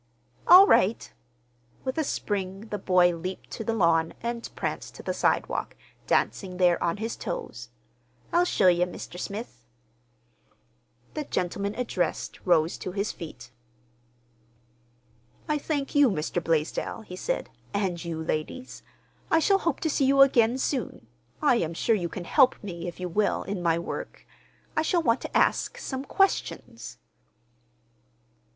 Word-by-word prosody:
"All 370 +3 +10
right!" 220 - +2 0.7
With 260 -1 -2
a - - +2
spring 200 -4 -3
the 210 - -2
boy 180 -2 +4
leaped 185 +3 -6
to 225 - -5
the 225 +1 -1
lawn 165 -4 +2
and 235 0 -3
pranced - - -4
to - - -10
the - - -2
sidewalk, - - 0 0.3
dancing 185 -2 0
there 180 -2 +3
on 170 +2 0
his 225 +2 -3
toes. 115 +1 -6 0.6
"I'll 345 +1 +5
show 210 - +2
ye, 175 -1 +5
Mr. 180 0 -8
Smith." 200 - -6 1.5
The 305 -1 -4
gentleman 200 0 -2
addressed 230 -8 -2
rose 165 -2 +3
to 185 - -5
his 200 +2 -1
feet. 125 -7 -10 2.0
"I 300 -1 0
thank 285 -2 -2
you, 290 -3 +6
Mr. 170 -1 -2
Blaisdell," 165 +7 -1
he 180 - -9
said, - - -3 0.2
"and 190 -4 -1
you, 165 -2 -4
ladies. 160 +12 -4 0.5
I 320 - +4
shall 390 +5 +3
hope 335 -6 -1
to 320 - 0
see 275 - +2
you 275 +1 +5
again 245 -2 +3
soon. 265 0 -2 0.4
I 265 -5 +5
am 165 -6 -2
sure 225 - +2
you 175 -4 -2
can 180 -1 -6
help 260 - +5
me, 175 -3 -6
if 175 - -7
you 180 - -3
will, 205 +4 0
in 195 -2 -4
my 165 -1 +2
work. 170 - -6 0.5
I 310 - +3
shall 335 +2 +1
want 230 -3 +2
to - - -1
ask—some 265 0 0
questions." 390 +5 -1
200 Hz, 145 wpm, -27 LUFS, 175-260 Hz, 2.0 s, All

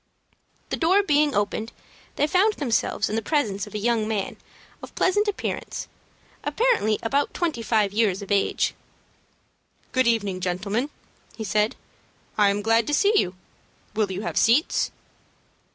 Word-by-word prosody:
The - - 0
door 370 +5 +4
being 295 - +2
opened, 205 +2 -1 0.4
they 290 - +2
found 375 +7 +3
themselves 230 -5 0
in 215 - -3
the 225 - 0
presence 215 -9 -1
of 210 - -11
a - - 0
young 220 0 +1
man 210 -3 -2 0.4
of - - -11
pleasant 415 +3 +2
appearance, 410 - -3 0.6
apparently 450 - +2
about 275 +5 0
twenty 320 -9 -1
five 215 -3 +1
years 205 -3 +1
of 200 - -9
age. 200 -1 +1 1.2
"Good 255 -1 +2
evening, 205 -5 +1
gentlemen," 200 +8 -1 0.5
he 220 - -4
said. 210 +1 +1 0.6
"I 205 -1 +4
am 205 +1 -1
glad 225 +1 +3
to 295 - +2
see 405 +7 +3
you. 180 - +2 0.6
Will 210 -2 0
you 190 +1 -4
have - - -3
seats?" 240 +8 +3
225 Hz, 150 wpm, -24 LUFS, 205-290 Hz, 1.2 s, door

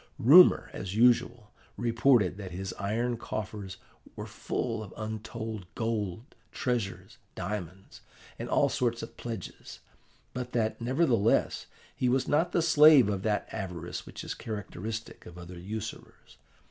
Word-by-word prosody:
Rumour, 150 +8 +7
as 95 +1 -5
usual, 120 -1 +3 0.3
reported 115 -4 +3
that 100 -3 -7
his 95 +1 -5
iron 115 +4 -1
coffers 105 -4 -6 0.4
were - - -6
full - - -3
of 105 - -9
untold 110 -2 -5
gold, 110 -1 -3 0.2
treasures, 120 -6 -3 0.2
diamonds, 95 0 -6 0.4
and - - -5
all - - +3
sorts 120 -2 -1
of - - -9
pledges, 115 -2 -7 0.6
but 125 0 -5
that, 115 -1 0
nevertheless, 120 -4 +2 0.3
he 125 - +1
was 130 +1 +1
not 165 +4 +2
the 170 - +2
slave 150 -7 +7
of 100 -2 -1
that 105 0 -1
avarice 90 -5 -5
which - - -8
is - - -4
characteristic 110 +1 -6
of 85 - -11
other 90 0 -9
usurers. 105 +4 -8
110 Hz, 135 wpm, -29 LUFS, 100-120 Hz, 0.6 s, Rumour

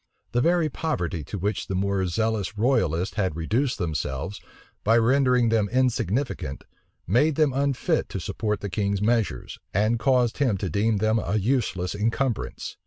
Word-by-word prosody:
The 120 - +1
very 170 +2 +3
poverty 90 - -2
to 105 - -5
which 100 +2 -2
the 95 - -2
more 95 0 0
zealous 105 +1 -1
royalists 95 - +1
had 95 -6 0
reduced 115 - 0
themselves, 80 0 -3 0.4
by 115 +2 +4
rendering 125 0 +3
them 110 -3 +2
insignificant, 120 - -1 0.4
made 140 - +3
them 150 -3 +2
unfit 140 -1 0
to - - -4
support 105 -2 -2
the 100 - -3
king's 100 +1 0
measures, 110 - -1 0.2
and 110 +4 +2
caused 125 0 +2
him 125 -8 +2
to 95 -2 -3
deem 105 +4 +1
them 110 +2 +2
a 105 - -2
useless 105 -5 0
encumbrance. 115 +3 -2
110 Hz, 155 wpm, -25 LUFS, 95-125 Hz, 0.4 s, by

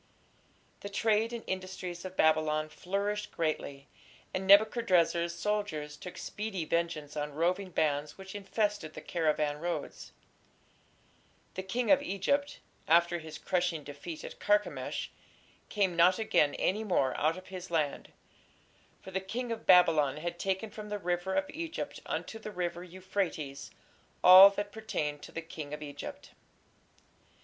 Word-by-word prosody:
The 200 - -7
trade 220 +2 +1
and 235 -1 -5
industries 185 -2 -5
of 185 0 -8
Babylon 155 -1 +2
flourished 200 +5 -3
greatly, 145 -4 -3 0.5
and 190 0 -3
Nebuchadrezzar's 180 -5 +4
soldiers 205 -9 -2
took 180 +4 -9
speedy 205 -5 -4
vengeance 155 -3 -2
on 150 -1 -4
roving 180 +4 0
bands 150 -3 0
which 190 0 -9
infested 205 -4 -2
the - - -7
caravan 150 -3 0
roads. 175 +2 -4 1.4
"The - - -4
king 230 +7 -1
of 285 -1 +6
Egypt", 285 +5 -1 0.3
after 170 +1 +4
his 160 -1 -9
crushing 175 -4 -1
defeat 145 +3 -8
at - - -9
Carchemish, 205 0 0 0.6
"came 195 -4 +1
not 175 +2 +5
again 150 -9 +2
any 210 +4 0
more 175 -10 +1
out 160 +3 +1
of 185 0 -11
his 185 -1 -7
land: 155 -4 -1 0.9
for 190 - -9
the 190 0 -1
king 235 +5 -4
of 225 -1 -5
Babylon 160 -6 +5
had 175 +2 -5
taken 195 +3 -2
from 210 -1 -8
the 210 - -2
river 180 0 -2
of 290 0 +1
Egypt 330 +1 -5
unto 225 - -4
the 215 - -7
river 175 -3 -3
Euphrates 180 -6 -4 0.5
all 185 +2 +11
that 205 +1 -4
pertained 155 -10 -3
to - - -10
the 165 - -5
king 155 -2 -6
of 150 - -9
Egypt." 145 -1 -8
180 Hz, 140 wpm, -31 LUFS, 155-205 Hz, 1.4 s, all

